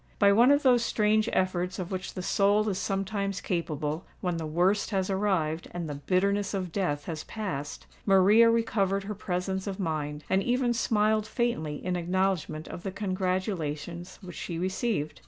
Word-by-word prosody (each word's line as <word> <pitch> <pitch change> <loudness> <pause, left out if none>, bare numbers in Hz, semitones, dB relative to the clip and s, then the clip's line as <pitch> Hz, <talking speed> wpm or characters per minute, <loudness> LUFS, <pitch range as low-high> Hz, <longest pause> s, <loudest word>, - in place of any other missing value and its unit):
By 200 -1 +5
one 235 +5 +6
of 285 +1 +4
those 245 -3 +5
strange 215 0 +2
efforts 185 -1 0
of 185 -1 -5
which 185 0 -4
the 185 - -4
soul 205 +2 +3
is 190 -2 -2
sometimes 195 +1 -2
capable, 160 -2 -2 0.2
when 180 -2 -1
"the 160 -1 -3
worst" 180 +6 +2
has 190 -2 0
arrived 185 -5 0
and 170 -2 -3
"the 150 - -4
bitterness 195 +7 0
of 185 -3 -3
death" 155 -6 -1
has 160 -2 -4
passed, 185 -10 -5 0.2
Maria 205 +4 +6
recovered 200 -4 +1
her 210 +2 -4
presence 190 0 -3
of 195 0 -4
mind, 155 -4 -2
and 190 +1 +2
even 245 +2 +1
smiled 215 -1 +2
faintly 215 -11 -1
in 180 0 0
acknowledgment 175 -3 -1
of - - -7
the 195 - -3
congratulations 185 -4 -3
which 180 -2 -9
she 170 - -4
received. 185 - -2
190 Hz, 170 wpm, -28 LUFS, 175-205 Hz, 0.2 s, one